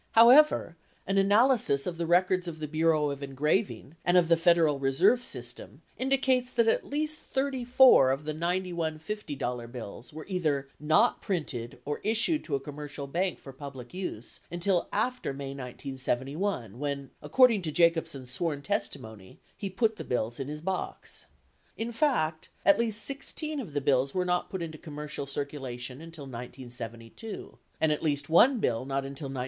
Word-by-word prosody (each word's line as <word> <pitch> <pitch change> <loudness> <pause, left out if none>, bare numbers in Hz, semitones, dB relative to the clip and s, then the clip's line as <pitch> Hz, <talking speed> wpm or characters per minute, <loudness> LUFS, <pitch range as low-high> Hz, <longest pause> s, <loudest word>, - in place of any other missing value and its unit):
However, 235 - +6 0.3
an 195 +1 +2
analysis 205 - +4
of 175 -2 -3
the 170 - -1
records 180 +1 +3
of 165 -2 -5
the 155 - -3
Bureau 155 -1 +2
of 140 0 -6
Engraving 150 +4 -1
and 175 +1 +4
of 170 -2 +4
the 170 - +7
Federal 165 -4 +3
Reserve 135 - +3
System - - -4
indicates 260 -1 +1
that 235 -3 +2
at 225 - +2
least 305 +1 -1
34 260 - +4
of 135 +3 -1
the 155 0 -3
91 170 -1 -1
$50 145 - -4
bills 120 -1 -8
were 155 +1 -8
either 155 -8 -1
not 160 +10 +3
printed 140 - -3
or 145 0 -3
issued 230 +9 +3
to 145 - -1
a - - 0
com 145 +1 -9
mercial 145 -1 -6
bank 180 +3 0
for 135 - -11
public 135 -2 -9
use 180 - -4
until 175 +1 0
after 250 - -1
May 140 0 -5
1971 130 - -3
when, 140 -2 -3
according 220 - +4
to 160 -3 -3
Jacobsen's 165 -6 +1
sworn 145 +1 -2
testimony, 110 - -4 0.2
he 200 - -4
put 215 +3 +1
the - - -5
bills 120 0 -2
in 135 - -3
his 150 +1 -6
box. 185 +2 -4 0.5
In 230 +1 -3
fact, 225 - 0 0.2
at 200 - +6
least 220 -2 +1
16 300 +2 -3
of 200 - -7
the 145 - 0
bills 135 0 +2
were 180 -1 +1
not 180 0 0
put 190 -3 -4
into 155 -2 -7
commercial 150 -2 -6
circulation 135 -2 -5
until 165 -2 -9
1972, 120 - -8 0.2
and 160 - +3
at 150 - -1
least 145 -2 -1
1 245 +10 +6
bill 120 - 0
not 135 0 -2
until 140 +2 -7
1973. 135 -1 -5
155 Hz, 165 wpm, -29 LUFS, 135-195 Hz, 0.5 s, the